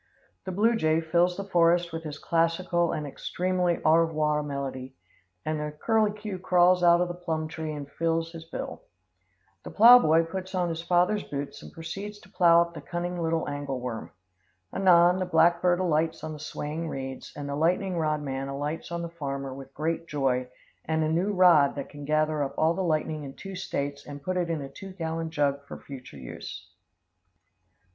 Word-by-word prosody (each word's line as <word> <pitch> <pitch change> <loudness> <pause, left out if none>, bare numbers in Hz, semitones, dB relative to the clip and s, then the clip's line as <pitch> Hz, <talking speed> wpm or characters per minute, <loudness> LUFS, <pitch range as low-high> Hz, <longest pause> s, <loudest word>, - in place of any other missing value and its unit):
The 190 - -3
blue 220 +5 +3
jay 160 -6 +2
fills 175 +2 +1
the 200 - -3
forest 175 -2 +2
with 165 0 -5
his 150 -1 -5
classical 170 +1 +1
and 150 - -3
extremely 180 +4 -1
au 155 +1 +6
revoir 155 -2 +1
melody, 135 -2 -5 0.5
and 155 0 -1
the 150 0 -3
curculio 210 +2 0
crawls 180 0 +4
out 175 0 +6
of 180 - +1
the 175 - -4
plum 160 -3 -3
tree 160 -1 -5
and 145 -2 -6
files 165 +2 -1
his 165 -1 -9
bill. 165 - -6 0.8
The - - -8
plow 240 +3 +9
boy 165 -6 +4
puts 185 +3 -6
on 180 -1 +1
his 165 0 -3
father's 180 +4 +2
boots 140 0 -6
and - - -11
proceeds 195 +6 -7
to 190 - -19
plow 170 -3 +6
up 170 0 -10
the 155 - -8
cunning 175 +2 -4
little 165 0 0
angle 145 -2 -3
worm. 115 -8 -5 0.6
Anon, 180 -1 +5
the 185 - 0
black 170 0 +4
bird 180 -1 +3
alights 160 -3 0
on 155 0 -4
the 150 - -9
swaying 155 +2 -4
reeds, 135 -1 -6
and 145 -1 -5
the 140 - -3
lightning 180 +5 +1
rod 155 -2 0
man 135 -1 -3
alights 145 +5 -4
on 170 0 -3
the 170 - -4
farmer 140 -2 -3
with 135 0 -10
great 165 +2 -2
joy 130 -4 0 0.4
and 160 0 0
a 155 - 0
new 175 +6 +1
rod 175 -7 +5
that 140 - -5
can 145 -1 -9
gather 155 0 +1
up 135 - -4
all 160 +1 +3
the 190 - -3
lightning 155 -3 -1
in 135 -1 -8
two 195 -1 -8
States 140 -6 -3
and 145 -1 -8
put 185 +4 -2
it 175 -2 0
in 160 -4 -2
a - - -6
two 190 +7 -10
gallon 165 -2 -3
jug 140 -3 0
for - - -7
future 130 - -10
use. 65 -3 -9
165 Hz, 195 wpm, -27 LUFS, 145-175 Hz, 0.8 s, plow